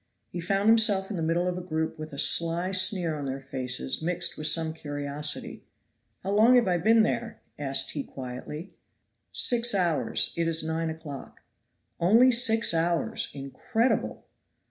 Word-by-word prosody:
He 175 - -5
found 195 +4 0
himself 215 -3 +4
in - - -3
the 170 - -3
middle 165 +2 0
of 180 0 -2
a - - -6
group 160 -2 -3
with 155 0 -7
a 140 - -9
sly 170 +5 +2
sneer 185 -3 +2
on 145 -2 -5
their 135 0 -4
faces 130 - -3
mixed 175 +2 0
with 155 - -1
some 160 0 +1
curiosity. 145 -1 -5 0.6
"How 195 - -3
long 220 +5 +5
have 245 -4 +4
I 175 -1 +1
been 225 +5 +4
there?" 230 0 -3 0.2
asked 135 -2 -1
he 145 - -4
quietly. 135 +8 -8 0.6
"Six 240 -2 +3
hours; 175 -5 0
it 170 -1 -1
is 165 -1 +1
nine 160 +1 -2
o'clock." 160 -4 -9 0.6
"Only 225 +9 +5
six 230 -4 +2
hours! 165 0 -1
incredible!" 220 - -2
170 Hz, 160 wpm, -27 LUFS, 150-200 Hz, 0.6 s, long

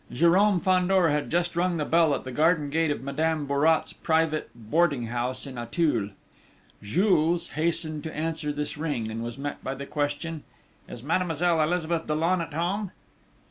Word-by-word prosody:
Jérôme 180 +6 +3
Fandor 185 -2 +3
had 150 0 -1
just 175 +1 0
rung 175 0 +1
the 150 - -1
bell 165 -3 +3
at - - -5
the 130 - -6
garden 150 +1 +2
gate 160 +1 +1
of 145 - -2
Madame 155 +2 -1
Bourrat's 145 +3 +2
private 160 -1 0
boarding 135 +3 +1
house 120 +2 -3
in 130 -3 -7
Auteuil. 120 - 0 0.7
Jules 170 - +2
hastened 160 -1 -1
to 160 - -6
answer 155 -1 -2
this 150 0 -4
ring, 135 -9 -2
and 115 +1 -4
was 120 +2 -6
met 145 +1 -5
by 135 - -3
the 140 +1 -7
question: 150 +2 -3 0.5
"Is 120 - -9
Mademoiselle 165 +1 +1
Elizabeth 165 0 0
Dollon 165 +4 +1
at 165 -2 -6
home?" 190 +5 -1
155 Hz, 165 wpm, -26 LUFS, 145-170 Hz, 0.7 s, Jérôme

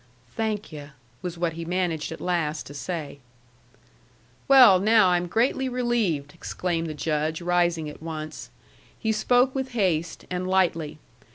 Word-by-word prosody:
"Thank 215 -3 -2
yu'," 145 -2 -9 0.3
was 175 -1 -5
what 170 -1 -1
he 165 +1 -6
managed 170 -2 -2
at 160 - -7
last 165 -4 -1
to 145 - -10
say. 145 -2 -5 1.3
"Well, 250 -9 +8
now, 215 -1 +5
I'm 175 0 +1
greatly 250 +6 +1
relieved!" 230 - -1
exclaimed 170 -1 -3
the 155 - -5
Judge, 155 +1 -1
rising 175 -2 +1
at 150 - -9
once. 155 -1 -6 0.5
He 220 - -1
spoke 245 +4 +3
with 265 -2 -3
haste, 170 -7 -1
and 180 0 -2
lightly. 165 -5 +1
175 Hz, 145 wpm, -25 LUFS, 160-215 Hz, 1.3 s, Well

